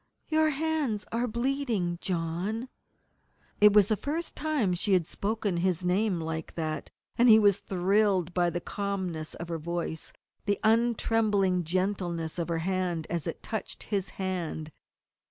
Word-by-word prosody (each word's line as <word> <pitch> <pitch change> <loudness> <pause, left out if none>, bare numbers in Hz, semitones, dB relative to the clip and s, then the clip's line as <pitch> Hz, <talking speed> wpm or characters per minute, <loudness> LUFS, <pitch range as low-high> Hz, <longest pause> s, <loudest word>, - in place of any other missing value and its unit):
"Your 315 0 +3
hands 295 -8 -1
are 235 +2 0
bleeding, 235 -7 -1
John!" 185 +7 -2 0.9
It 210 0 +8
was 205 -2 +6
the 215 - +2
first 315 +9 -4
time 290 -11 0
she 190 +3 +1
had 180 -3 +3
spoken 205 0 -2
his 180 0 0
name 185 0 +1
like 160 0 -4
that, 155 -2 -3 0.3
and 240 +1 +6
he 220 - +10
was 205 -3 +4
thrilled 190 -1 +1
by 175 -1 +2
the 175 +1 -3
calmness 185 -7 -3
of 170 - -6
her 165 -1 -2
voice, 170 0 -4 0.3
the 200 -2 +1
untrembling 220 -5 +2
gentleness 175 -2 -1
of 170 - -1
her 165 - 0
hand 185 -4 -1
as 170 -1 -2
it 165 - -5
touched 220 -1 -4
his 200 -3 -2
hand. 175 -5 -3
190 Hz, 150 wpm, -29 LUFS, 175-220 Hz, 0.9 s, he